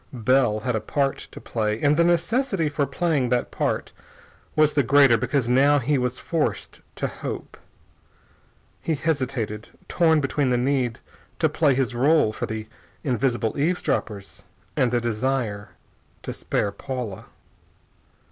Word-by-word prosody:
Bell 120 -2 +2
had 125 0 -1
a 110 - -1
part 140 -2 -1
to - - -10
play, 110 -1 -2
and 145 +1 +3
the 170 - +4
necessity 175 - +1
for 145 -1 -1
playing 145 -3 0
that 125 0 0
part - - -2 0.6
was 155 -1 +4
the 145 - +3
greater 135 -1 +5
because 125 +2 0
now 140 +4 +4
he 140 +1 +1
was 125 0 -1
forced 165 -3 -2
to - - -3
hope. - - -6 1.3
He 160 - -1
hesitated, 130 -8 -2 0.2
torn 160 -2 +3
between 140 -1 0
the 125 - +2
need 125 -2 0 0.4
to - - +2
play 145 -5 +2
his 130 -1 0
rôle 135 -2 +3
for - - -4
the 110 -1 -5 0.4
invisible 120 -3 0
eavesdroppers 135 - -2 0.3
and 125 - +2
the 120 0 +1
desire 115 -3 -2 0.5
to - - -5
spare 100 - -1
Paula. 120 -2 -6
130 Hz, 140 wpm, -24 LUFS, 120-150 Hz, 1.3 s, greater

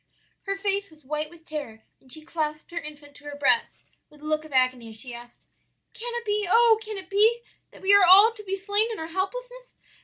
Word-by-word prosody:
"Her 395 - -1
face 395 0 -2
was 310 -3 -21
white 300 +2 -3
with 335 -1 -18
terror, 280 -9 -7 0.2
and 260 - -12
she 310 +1 -3
clasped 310 -2 -4
her 340 - -3
infant 295 -2 -11
to 290 - -18
her 290 0 -7
breast 290 +11 +1 0.2
with 300 -1 -20
a - - -11
look 310 0 0
of 310 - -13
agony, 255 -3 +1
as 220 -1 -3
she 250 -1 -5
asked, 240 0 -12 0.5
'Can 475 0 -5
it 475 -1 -4
be, 415 -1 0
oh 455 +1 +5
can 430 -1 -6
it 380 -1 -8
be 435 +4 +3 0.3
that - - -17
we 390 +1 +4
are 405 -1 +7
all 390 +5 +8
to 440 -2 -10
be 390 -1 -3
slain 410 +4 0
in 445 - -5
our 320 0 -6
helplessness? - - -5
355 Hz, 235 wpm, -25 LUFS, 300-420 Hz, 0.5 s, all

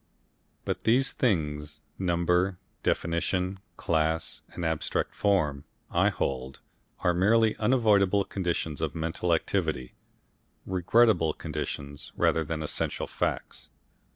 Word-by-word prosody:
But - - -1
these 125 +4 +3
things, 75 - -1 0.2
number, 90 +1 +1 0.2
definition, 90 +3 0 0.2
class 80 0 0
and 85 - -5
abstract 80 -1 -1
form, 75 -9 +1 0.3
I - - +4
hold, 65 0 -3 0.4
are 90 -1 +3
merely 110 +5 +4
unavoidable 105 -4 +3
conditions 85 -6 -2
of 80 -1 -2
mental 80 +2 -1
activity 65 -5 0 0.7
regrettable 95 -2 +3
conditions 75 -2 -5
rather 80 - +2
than 80 0 -3
essential 75 - -2
facts. - - -3
85 Hz, 100 wpm, -28 LUFS, 80-100 Hz, 0.7 s, I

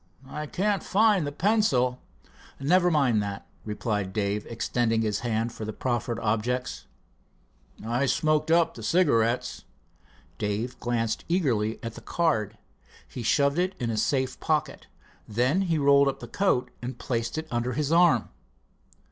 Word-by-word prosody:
I 150 +2 -5
can't 200 +5 0
find 205 -6 +3
the - - -3
pencil." 145 - +1 0.6
"Never 175 +6 +3
mind 135 -9 +2
that," 100 -1 -5 0.2
replied 105 -2 -3
Dave, 105 -1 -1
extending 115 0 0
his 105 -2 -1
hand 115 0 -1
for 110 - -7
the 110 0 -4
proffered 120 -1 -2
objects. 115 +3 -2 1.0
"I 120 +4 0
smoked 155 +4 +1
up 170 0 +3
the 115 - -10
cigarettes." 120 -4 +1 0.8
Dave 110 +4 -2
glanced 115 -2 -1
eagerly 120 - +1
at 115 -1 -5
the - - -11
card. 115 - 0 0.5
He 125 - -7
shoved 140 +6 +2
it 185 +1 0
in 120 -3 -1
a - - -2
safe 130 +3 0
pocket. 155 -3 -1 0.4
Then 125 - +1
he 170 -4 +1
rolled 140 -1 +5
up 135 - -1
the 120 - -8
coat 160 -5 0
and 125 0 -5
placed 115 +3 -3
it 160 0 -4
under 120 +1 -1
his 150 +3 -1
arm. 165 -9 +4
125 Hz, 150 wpm, -27 LUFS, 115-155 Hz, 1.0 s, rolled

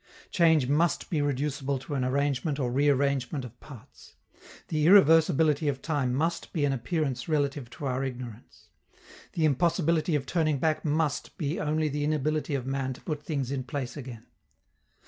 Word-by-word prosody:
Change 160 -6 +4
must 155 +4 +1
be 155 -4 +1
reducible 140 0 -1
to 135 +3 -7
an 135 -2 0
arrangement 140 +2 0
or 125 -4 -1
rearrangement 140 0 +1
of 120 0 -12
parts; 130 -8 -14 0.5
the 155 -1 +1
irreversibility 160 -4 +5
of 135 -2 -2
time 145 -6 0
must 165 +6 -1
be 150 -4 +1
an 140 - +1
appearance 135 0 -2
relative 140 -4 -1
to 145 - -8
our 130 0 -1
ignorance; 125 -3 -8 0.6
the 160 - +1
impossibility 165 +2 +2
of 140 -2 -1
turning 155 0 +1
back 155 +3 0
must 155 -1 -1
be 155 0 -2
only 155 +1 0
the 145 0 -2
inability 150 0 0
of 130 -3 -3
man 135 -1 -2
to - - -14
put 150 -2 -4
things 140 -4 -3
in 135 -2 -2
place 130 -2 -5
again. 125 -5 -8
145 Hz, 165 wpm, -28 LUFS, 130-155 Hz, 0.6 s, irreversibility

